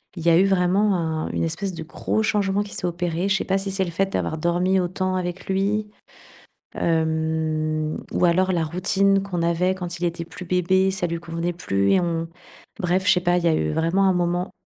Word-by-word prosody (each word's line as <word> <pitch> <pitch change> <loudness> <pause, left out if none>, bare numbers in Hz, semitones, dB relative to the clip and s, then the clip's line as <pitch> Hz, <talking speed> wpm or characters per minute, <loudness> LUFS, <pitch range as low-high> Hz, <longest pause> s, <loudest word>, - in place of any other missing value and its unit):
il 170 - -6
y 170 - +4
a 165 - +6
eu 190 - +5
vraiment 195 +2 +2
un 160 -2 -2
une - - -2
espèce 175 +4 -3
de 165 - -7
gros 175 +6 -2
changement 205 -2 +1
qui 205 -1 -6
s'est - - -3
opéré. 175 +1 -1
Je 195 - +3
sais - - -3
pas 195 - +1
si 195 0 -3
c'est 190 0 0
le - - -4
fait 195 +3 -1
d'avoir 160 - -1
dormi 175 +3 +1
autant 185 +1 -1
avec 180 0 -4
lui, 200 +2 0 0.9
hem, 160 -1 0
ou - - +2
alors 185 +2 +3
la 170 -3 +1
routine 195 +4 +1
qu'on 180 -4 -3
avait, 170 +2 +1
quand 175 -2 -5
il 175 - -2
était 170 0 -2
plus 180 +2 -10
bébé, 185 +2 +2
ça 190 -2 -1
lui 170 0 -3
convenait 170 +1 -3
plus 100 - +1
et 190 - +4
on 165 -2 -1 0.5
bref, 185 +2 0
je - - +7
sais 180 - 0
pas, 175 0 +2
il 175 - -1
y - - +3
a 160 - +3
eu 75 0 0
vraiment 165 - +1
un 190 -1 +4
moment, 175 +1 -1
175 Hz, 225 wpm, -23 LUFS, 165-190 Hz, 0.9 s, je